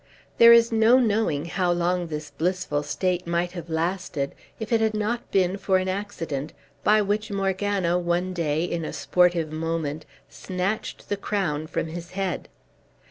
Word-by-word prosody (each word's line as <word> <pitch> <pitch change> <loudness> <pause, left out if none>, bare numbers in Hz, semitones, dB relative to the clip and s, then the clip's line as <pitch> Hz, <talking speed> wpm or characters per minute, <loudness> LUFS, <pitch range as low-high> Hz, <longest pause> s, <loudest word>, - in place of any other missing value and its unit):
There 235 0 +10
is 235 0 +6
no 225 +2 +5
knowing 215 - +1
how 175 +1 0
long 175 0 0
this 150 -2 -6
blissful 170 -3 -1
state 180 +4 -1
might 170 +1 0
have 175 -2 -8
lasted, 165 -3 -2 0.3
if 220 +1 -3
it 225 - +3
had 220 -1 +1
not 215 +3 -2
been 190 0 +2
for 190 0 +2
an 185 0 -1
accident, 170 -7 -4 0.3
by 215 0 +4
which 210 +2 -1
Morgana 195 -2 0
one 175 +1 -1
day, 160 -2 0
in 170 -1 -2
a - - -5
sportive 175 -3 +2
moment, 160 -1 -3 0.2
snatched 190 +3 -4
the 205 - 0
crown 175 -7 -2
from - - -2
his 170 +2 -8
head. 195 -1 -3
180 Hz, 160 wpm, -25 LUFS, 165-205 Hz, 0.3 s, There